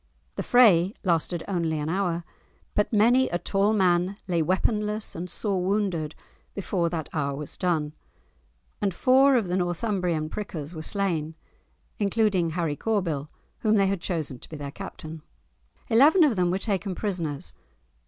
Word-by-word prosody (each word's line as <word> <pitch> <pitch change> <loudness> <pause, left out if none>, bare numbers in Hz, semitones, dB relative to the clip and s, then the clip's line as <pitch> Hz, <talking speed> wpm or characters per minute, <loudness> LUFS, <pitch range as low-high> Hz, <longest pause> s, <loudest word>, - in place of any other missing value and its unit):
The - - -2
fray 205 -6 +5
lasted 170 -2 0
only 170 -5 -1
an 150 0 -3
hour, 175 -1 -1 0.5
but 210 - +1
many 240 +4 +4
a 175 - 0
tall 195 +4 +1
man 185 -1 +2
lay 170 -3 +1
weaponless 210 +5 0
and 175 +2 -5
sore 190 0 -1
wounded 185 -6 -1 0.4
before 180 -3 -1
that 160 -2 -4
hour 140 -3 -1
was 150 +1 -6
done, 160 -5 -1 0.9
and 195 -4 0
four 265 +4 +5
of 225 -6 +1
the 175 - -1
Northumbrian 175 -3 -1
prickers 160 -4 -6
were 160 - -6
slain, 165 -4 -2 0.6
including 200 -4 +2
Harry 160 -2 -1
Corbyl 165 -8 -1 0.3
whom 215 -1 +2
they 200 -2 +4
had 195 -2 -1
chosen 155 -9 -3
to - - -13
be 155 - -7
their 140 -1 -6
captain. 160 +1 -8 0.7
Eleven 295 +10 +6
of 280 -7 +3
them 180 -2 +2
were 180 - +1
taken 195 -2 -2
prisoners. 170 -9 -3
180 Hz, 155 wpm, -26 LUFS, 160-210 Hz, 0.9 s, Eleven